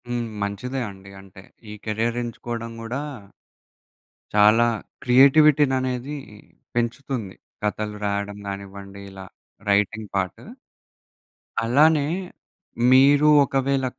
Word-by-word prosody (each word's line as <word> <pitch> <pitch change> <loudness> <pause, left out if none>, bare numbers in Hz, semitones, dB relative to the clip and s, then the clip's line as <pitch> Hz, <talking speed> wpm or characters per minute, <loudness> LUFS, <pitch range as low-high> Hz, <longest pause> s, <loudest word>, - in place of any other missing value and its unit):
హ్మ్. 120 -1 -2
మంచిదే 105 +7 -3
అండి. 95 0 -14
అంటే 95 0 -15 0.3
ఈ - - -7
కెరియర్ 115 +2 -1
ఎంచుకోవడం 115 0 -6
గూడా... 120 +5 -4 1.3
చాలా 105 +3 +6 0.4
క్రియేటివిటీననేది 135 0 +4 0.6
పెంచుతుంది. 120 -3 -3 0.3
కథలు 105 0 -2
రాయడం 100 0 -2
గానివ్వండి 100 0 -8
ఇలా 95 0 -10 0.4
రైటింగ్ 105 +1 +1
పార్ట్. 95 -2 -2 1.2
అలానే 145 +5 +4 0.8
మీరు 140 +3 +6 0.2
ఒకవేళ 135 0 0
115 Hz, 85 wpm, -23 LUFS, 100-135 Hz, 1.3 s, చాలా